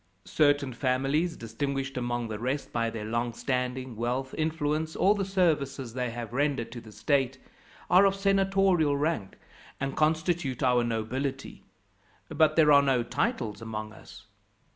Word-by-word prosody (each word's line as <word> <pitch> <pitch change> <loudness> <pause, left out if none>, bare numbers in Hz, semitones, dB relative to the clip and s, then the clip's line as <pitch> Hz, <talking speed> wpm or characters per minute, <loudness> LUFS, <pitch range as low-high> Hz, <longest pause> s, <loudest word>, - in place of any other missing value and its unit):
Certain 145 -3 +2
families, 135 +7 0
distinguished 135 +4 -3
among 120 -1 -2
the 110 -2 -5
rest 130 +4 -3
by 115 -1 0
their 110 -2 -6
long 115 +2 -1
standing, 125 0 -2
wealth, 125 +4 -2
influence, 155 0 -1
or 200 - +4
the 205 -1 -2
services 150 - 0
they 125 -1 -2
have 115 0 -6
rendered 135 -4 0
to 120 0 -7
the 110 - -13
state, 135 +4 0 0.5
are 185 +3 +6
of 195 0 +3
senatorial 195 -6 +2
rank, 145 -10 -2 0.4
and 135 0 -3
constitute 155 -4 0
our 125 -1 +3
nobility; 120 +4 -3 0.7
but 155 0 +3
there 155 -2 +5
are 140 -1 +8
no 135 -3 +2
titles 115 -2 -2
among 110 -1 -6
us. - - -14
135 Hz, 145 wpm, -28 LUFS, 120-155 Hz, 0.7 s, are